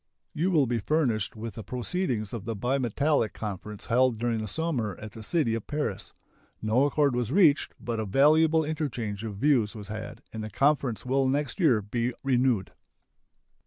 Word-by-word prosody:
You 170 +5 0
will 155 -7 +4
be 120 -1 -1
furnished 120 -4 0
with 110 +1 -6
the 110 - -7
proceedings 125 - -2
of 110 -4 -5
the 115 0 -3
Bimetallic 130 +2 +1
Conference 105 0 -6
held 125 0 +3
during 115 0 -1
the 110 - -4
summer 125 - -1
at 110 -1 -8
the 110 - -10
city 135 -1 0
of 115 -2 -4
Paris. 150 0 -3 0.5
No 110 +6 +2
accord 145 -2 +2
was 120 -1 -1
reached, 160 -4 +4
but 115 -2 -3
a 110 - -1
valuable 155 +8 +4
interchange 120 -9 -3
of 105 -3 -5
views 120 -4 +2
was 105 -2 -8
had, 110 +1 -7
and 110 -1 -5
the 110 - -5
conference 135 0 +1
will 135 +1 +2
next 145 +6 -1
year 130 - +4
be 120 +4 -2
renewed. 125 -6 +1
120 Hz, 175 wpm, -27 LUFS, 110-145 Hz, 0.5 s, will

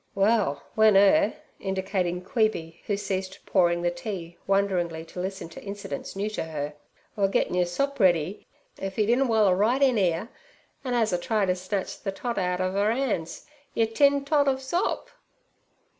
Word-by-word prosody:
'Well, 200 -6 +2
w'en 220 -2 +5
'er'—indicating 190 -2 +1
Queeby, 190 -6 -1
who 205 - 0
ceased 190 -1 -4
pouring 175 -2 +2
the 175 - +2
tea 175 -1 -6
wonderingly 180 -5 0
to 180 - -9
listen 190 0 -4
to 165 - -11
incidents 200 -8 -6
new 200 +2 -1
to - - -3
her—'were 150 +6 -4
gettin' 195 - 0
your 180 -1 +2
sop 275 +10 -2
ready, 180 -1 +2 0.3
if 195 0 -5
'e 215 - +3
didn' 245 +5 +3
waller 215 -5 +4
right 220 +7 +2
in 255 -5 +4
'ere, 180 +3 0 0.5
an' 250 -2 -1
'as 225 -4 +2
a 175 - +1
try 210 +2 +1
ter 180 - +2
snatch 185 +2 -4
ther 195 - -5
tot 230 +3 -3
out 180 -1 0
ov 185 +1 -1
'er 205 +1 +2
'ands, 225 -10 -2 0.3
yer 225 - +3
tin 280 +5 +3
tot 290 -1 +3
ov 265 -1 +2
sop.' 345 +9 -2
195 Hz, 170 wpm, -26 LUFS, 180-220 Hz, 0.5 s, w'en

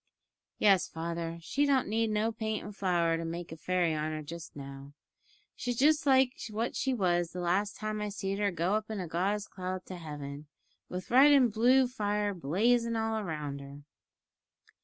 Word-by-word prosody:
"Yes, 195 -3 +4
father, 165 0 -4
she 285 - +1
don't 270 -2 +2
need 225 +2 +1
no 215 +1 +1
paint 220 -1 -3
and 205 -1 -8
flour 170 -4 +1
to 165 - -4
make 170 +1 -5
a - - -5
fairy 175 0 0
on 155 0 -2
her 155 0 -4
just 165 +1 -9
now. 140 0 -9 0.6
She's 245 -1 -3
just 295 +2 +3
like 265 -1 +5 0.2
what 220 +3 -2
she 265 - 0
was 175 -7 +1
the 180 - -5
last 185 +4 0
time 215 0 -3
I 210 - -2
seed 195 -1 -3
her 205 -1 +2
go 175 +1 0
up 215 0 -1
in 215 -2 -3
a 180 - -4
gauze 195 +5 -1
cloud 185 0 -5
to 185 - -7
heaven, 145 -2 -7 0.4
with 180 +3 -6
red 270 +4 +7
and 255 -6 +5
blue 250 +4 +5
fire 210 -4 -1
blazin' 230 - +1
all 220 0 0
round 150 -5 -4
her." 140 +1 -11
195 Hz, 185 wpm, -31 LUFS, 165-220 Hz, 0.6 s, red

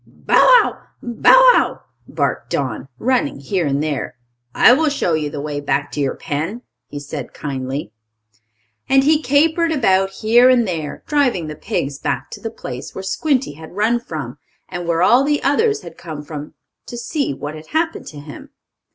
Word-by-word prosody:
"Bow - - -7
wow! - - +5 0.2
Bow - - +6
wow!" - - 0 0.3
barked - - -2
Don, - - -3
running 250 - 0
here 165 +4 -1
and 140 +1 0
there. 150 -5 -3 0.4
"I 245 - +7
will 310 +3 +2
show 230 - -1
you 155 -2 -1
the 145 - -6
way 145 0 -4
back 140 0 -1
to - - -5
your 140 -2 0
pen," 165 - -4 0.2
he 145 - -7
said, 145 -2 -7
kindly. 135 -3 -4 1.0
And 270 0 +5
he 305 +2 +3
capered 320 +5 +2
about, 195 -10 +2
here 230 +5 +4
and 240 -3 +3
there, 160 -5 -4
driving 265 - +1
the 155 0 -6
pigs 140 -1 -3
back 135 +1 -3
to - - -8
the 225 - -4
place 130 - -8
where 190 - -6
Squinty 265 - 0
had 160 +3 -12
run 220 +4 +2
from, 235 - -7 0.3
and 175 -1 -6
where 170 0 +1
all 245 +7 +5
the 295 +1 0
others 425 +9 +2
had - - -11
come 155 -3 -7
from, 150 0 -8 0.3
to 240 - -7
see 270 - -2
what 145 +2 -6
had 155 0 -11
happened 325 +1 -2
to 150 - -9
him. 145 0 -11
190 Hz, 180 wpm, -19 LUFS, -, 1.0 s, I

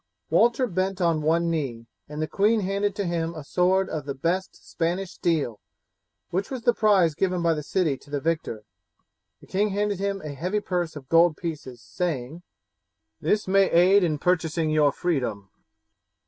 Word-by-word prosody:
Walter 240 +2 +4
bent 190 -2 -2
on 165 -3 +2
one 165 +2 +1
knee, 130 -8 -3 0.2
and 150 0 -6
the - - -2
queen 215 +5 +2
handed 200 +1 -1
to 200 - -2
him 170 -1 -2
a 155 - -7
sword 185 +5 +2
of 150 -5 -5
the 140 - -3
best 175 +7 -3
Spanish 175 +3 -2
steel, 150 -10 -1 0.7
which 190 +3 -1
was 255 -3 -5
the 240 - +4
prize 195 -7 +3
given 180 +1 -1
by 165 -1 +3
the 150 - -3
city 155 -2 0
to - - -20
the 145 0 -2
victor. 155 -8 -2 0.8
The - - -14
king 205 +3 0
handed 205 -1 -1
him 200 0 -1
a 150 -2 -6
heavy 180 +9 -1
purse 175 -5 -2
of 140 -3 -9
gold 165 0 +4
pieces, 145 -8 -6
saying: 155 +2 -3 0.8
"This 210 +7 0
may 195 0 +4
aid 185 +4 +5
in 155 -3 +1
purchasing 160 -1 0
your 150 -2 +4
freedom." 125 - -2
170 Hz, 175 wpm, -25 LUFS, 150-190 Hz, 0.8 s, aid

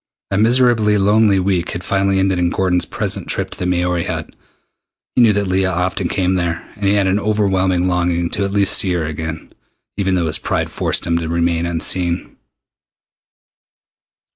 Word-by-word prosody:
A 100 - 0
miserably 115 -2 +3
lonely 105 0 +3
week 90 -2 -1
had 90 - -5
finally 95 +1 +1
ended 95 -1 +1
in 85 -1 +2
Gordon's 90 0 0
present - - -3
trip - - -2
to - - -11
the 90 - -1
Maori 90 -1 0
Hut. - - -4 0.8
He 125 - +4
knew 115 -3 +6
that 100 0 0
Leah 95 0 +1
often 90 +1 -1
came 95 -1 0
there, 85 -2 -2
and 105 -1 -5
he 100 +1 +3
had 100 -1 +2
an 95 +2 +1
overwhelming 95 -4 +1
longing 85 -1 0
to 100 - -1
at 100 - -1
least 100 -1 +2
see 95 -2 +2
her 85 -3 -1
again, 80 +1 -6 0.4
even 95 -2 0
though 90 -2 0
his 80 0 0
pride - - -2
forced - - 0
him 85 0 0
to 80 - -4
remain 85 0 0
unseen. 85 +1 -2
95 Hz, 180 wpm, -18 LUFS, 85-100 Hz, 0.8 s, knew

